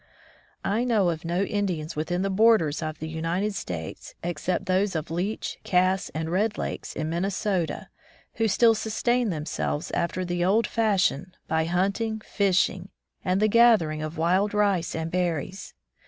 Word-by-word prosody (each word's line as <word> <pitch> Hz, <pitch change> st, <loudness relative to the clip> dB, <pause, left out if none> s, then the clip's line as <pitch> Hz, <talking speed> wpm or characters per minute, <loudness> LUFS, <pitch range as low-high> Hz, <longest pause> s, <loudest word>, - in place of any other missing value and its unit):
I 220 Hz, +4 st, +1 dB
know 220 Hz, -7 st, +2 dB
of 165 Hz, 0 st, -6 dB
no 175 Hz, +3 st, 0 dB
Indians 185 Hz, -7 st, -2 dB
within 175 Hz, +4 st, -1 dB
the 195 Hz, -, 0 dB
borders 190 Hz, -8 st, +4 dB
of 155 Hz, -1 st, -4 dB
the 160 Hz, -, -5 dB
United 165 Hz, +6 st, -1 dB
States, 80 Hz, -, -6 dB
except 175 Hz, +1 st, -2 dB
those 190 Hz, +1 st, +1 dB
of 160 Hz, 0 st, -3 dB
Leech, 185 Hz, +6 st, -3 dB
Cass 185 Hz, +1 st, +2 dB
and 160 Hz, +1 st, -2 dB
Red 205 Hz, +4 st, +1 dB
Lakes -, -, -4 dB
in 155 Hz, -, -2 dB
Minnesota, 185 Hz, 0 st, -1 dB, 0.5 s
who 225 Hz, 0 st, +2 dB
still 225 Hz, +2 st, +5 dB
sustain 230 Hz, +2 st, 0 dB
themselves 150 Hz, -2 st, -3 dB
after 185 Hz, +2 st, -1 dB
the 175 Hz, 0 st, -1 dB
old 205 Hz, +5 st, +3 dB
fashion 190 Hz, -7 st, +1 dB
by 160 Hz, 0 st, +1 dB
hunting, 200 Hz, +6 st, 0 dB
fishing 190 Hz, -2 st, +1 dB, 0.3 s
and 185 Hz, +1 st, +1 dB
the 215 Hz, -, +4 dB
gathering 215 Hz, -9 st, +4 dB
of 155 Hz, +1 st, -5 dB
wild 185 Hz, +6 st, +2 dB
rice 200 Hz, -5 st, +1 dB
and 160 Hz, 0 st, -3 dB
berries. 180 Hz, 0 st, -2 dB
185 Hz, 155 wpm, -26 LUFS, 165-205 Hz, 0.5 s, still